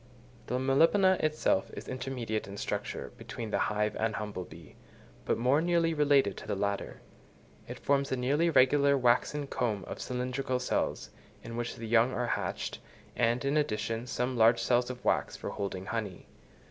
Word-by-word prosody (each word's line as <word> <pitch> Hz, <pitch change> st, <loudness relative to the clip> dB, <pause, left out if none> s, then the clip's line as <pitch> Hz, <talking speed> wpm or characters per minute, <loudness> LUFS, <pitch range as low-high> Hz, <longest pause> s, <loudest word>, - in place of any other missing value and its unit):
The 125 Hz, -, -1 dB
Melipona 165 Hz, +9 st, +4 dB
itself 155 Hz, -10 st, +1 dB
is -, -, -8 dB
intermediate 125 Hz, -5 st, -3 dB
in 100 Hz, 0 st, -8 dB
structure -, -, -4 dB
between 115 Hz, -2 st, -6 dB
the -, -, +1 dB
hive 105 Hz, 0 st, 0 dB
and 110 Hz, 0 st, 0 dB
humble 105 Hz, -4 st, -4 dB
bee, 80 Hz, -2 st, -14 dB, 0.5 s
but -, -, +1 dB
more 130 Hz, +6 st, +3 dB
nearly 170 Hz, -1 st, +2 dB
related 140 Hz, -9 st, +3 dB
to -, -, -9 dB
the 105 Hz, -, -1 dB
latter: 100 Hz, 0 st, -3 dB, 0.7 s
it -, -, -7 dB
forms 140 Hz, 0 st, +1 dB
a 130 Hz, -, 0 dB
nearly 145 Hz, +7 st, +2 dB
regular 140 Hz, -1 st, +4 dB
waxen 130 Hz, +4 st, +2 dB
comb 110 Hz, -7 st, -2 dB
of -, -, -7 dB
cylindrical 125 Hz, +1 st, -2 dB
cells, 125 Hz, -, -2 dB, 0.3 s
in 115 Hz, -, -7 dB
which 120 Hz, 0 st, -3 dB
the 115 Hz, -, -7 dB
young 120 Hz, +3 st, +4 dB
are 125 Hz, -, -1 dB
hatched, -, -, -3 dB, 0.4 s
and, 120 Hz, +2 st, +1 dB
in 140 Hz, +2 st, +2 dB
addition, 115 Hz, -4 st, -1 dB
some 125 Hz, +2 st, -1 dB
large 115 Hz, 0 st, +5 dB
cells 125 Hz, 0 st, +2 dB
of 125 Hz, -1 st, -8 dB
wax -, -, +1 dB
for -, -, -5 dB
holding 95 Hz, -2 st, -4 dB
honey. 105 Hz, -4 st, -4 dB
125 Hz, 170 wpm, -30 LUFS, 110-140 Hz, 0.7 s, large